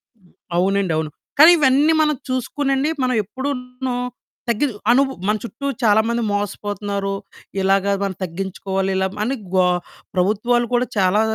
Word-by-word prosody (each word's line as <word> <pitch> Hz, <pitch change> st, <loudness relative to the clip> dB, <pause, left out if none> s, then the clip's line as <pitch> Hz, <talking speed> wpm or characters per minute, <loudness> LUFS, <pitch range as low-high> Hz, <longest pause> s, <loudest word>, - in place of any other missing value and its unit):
హ్మ్. 185 Hz, -5 st, -27 dB, 0.2 s
అవునండవును. 180 Hz, -5 st, +1 dB, 0.3 s
కానీ 320 Hz, +3 st, +10 dB
ఇవన్నీ 290 Hz, +2 st, +4 dB
మనం 300 Hz, -1 st, +2 dB
చూసుకోనండి, 270 Hz, +3 st, 0 dB
మనం 255 Hz, -1 st, +1 dB
ఎప్పుడూను 250 Hz, +1 st, -4 dB, 0.5 s
తగ్గిదు 235 Hz, 0 st, 0 dB, 0.2 s
అనుబు 270 Hz, +1 st, +3 dB
మన 210 Hz, -, +3 dB
చుట్టూ 245 Hz, +4 st, -7 dB, 0.2 s
చాలా 220 Hz, -1 st, +5 dB
మంది 235 Hz, 0 st, 0 dB
మోసపోతున్నారు. 205 Hz, 0 st, -2 dB, 0.5 s
ఇలాగ 195 Hz, +1 st, +2 dB, 0.2 s
మనం 195 Hz, -2 st, -2 dB
తగ్గించుకోవాలి, 190 Hz, +2 st, -3 dB
ఇలా 190 Hz, 0 st, +1 dB, 0.2 s
అని 265 Hz, +5 st, -1 dB, 0.2 s
గో 185 Hz, -1 st, +5 dB, 0.5 s
ప్రభుత్వాలు 220 Hz, +6 st, +2 dB
కూడా 245 Hz, +1 st, +3 dB
చాలా 195 Hz, +3 st, +3 dB
220 Hz, 125 wpm, -20 LUFS, 195-260 Hz, 0.5 s, కానీ